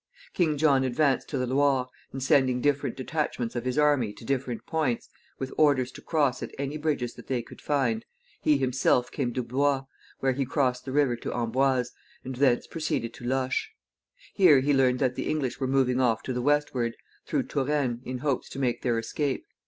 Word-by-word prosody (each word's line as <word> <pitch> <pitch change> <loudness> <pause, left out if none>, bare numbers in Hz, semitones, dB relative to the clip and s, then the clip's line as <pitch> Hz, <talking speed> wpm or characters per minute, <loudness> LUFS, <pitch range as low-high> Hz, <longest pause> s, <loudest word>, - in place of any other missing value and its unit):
King 160 -5 +1
John 140 -3 +4
advanced 130 +1 +1
to 140 - -2
the 125 - 0
Loire, 135 0 +2 0.2
and 135 -1 -5
sending 130 -2 +3
different 145 +2 0
detachments 130 -4 -2
of 120 0 -3
his 130 +2 -1
army 145 -8 +3
to 115 - -13
different 130 -4 -2
points, 150 -7 -1 0.3
with 130 0 -5
orders 135 -5 +3
to - - -11
cross 145 -6 +1
at - - -4
any 140 +2 -3
bridges 145 -6 -1
that - - -13
they 125 -3 -1
could - - -14
find, 125 -6 0 0.4
he 150 -2 +4
himself 130 -1 +1
came 130 -4 -1
to 125 - -1
Blois, 135 +2 +1 0.3
where 135 - +2
he 135 +2 -1
crossed 125 -2 0
the 135 - -4
river 140 -3 +2
to - - -5
Amboise, 125 +1 +1 0.3
and 130 0 -5
thence 130 -3 +3
proceeded 150 -8 -3
to 120 - -10
Loches. 130 0 0 0.6
Here 160 -9 +6
he 145 +2 +2
learned 130 -2 +3
that 130 -1 +1
the - - -3
English 140 -5 -1
were 135 - 0
moving 130 -1 +2
off 115 -3 +2
to 130 - -3
the 125 - -2
westward, 130 -4 +1 0.3
through - - 0
Touraine, 135 -4 -1
in 130 0 -4
hopes 135 0 -1
to - - -9
make 125 -3 0
their 120 -2 +1
escape. 135 +4 -2
130 Hz, 195 wpm, -27 LUFS, 125-145 Hz, 0.6 s, Here